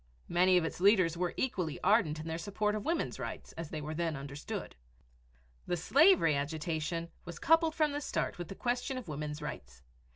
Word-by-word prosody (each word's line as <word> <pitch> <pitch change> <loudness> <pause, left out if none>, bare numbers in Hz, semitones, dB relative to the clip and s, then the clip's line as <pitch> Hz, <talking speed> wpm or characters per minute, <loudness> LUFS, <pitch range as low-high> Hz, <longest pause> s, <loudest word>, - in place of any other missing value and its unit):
Many 180 +1 +4
of 170 - +2
its 165 - -4
leaders 185 -4 +5
were 175 0 -2
equally 180 - -1
ardent 185 -6 +3
in 155 - -6
their 160 +1 -3
support 210 +4 -1
of 210 -1 -3
Women's 330 +6 -1
Rights - - -6
as 165 -2 -7
they 155 - -4
were 150 +1 -4
then 165 -1 -1
understood. 140 +1 -6 0.9
The 175 - 0
slavery 285 - +5
agitation 160 +3 -2
was 170 - -8
coupled 325 +1 +3
from 305 -2 +2
the 290 +1 -3
start 285 - -2
with 175 - -4
the 195 - -8
question 245 +3 -1
of 255 - -7
Women's 150 0 -4
Rights. 65 - -7
170 Hz, 190 wpm, -32 LUFS, 155-215 Hz, 0.9 s, leaders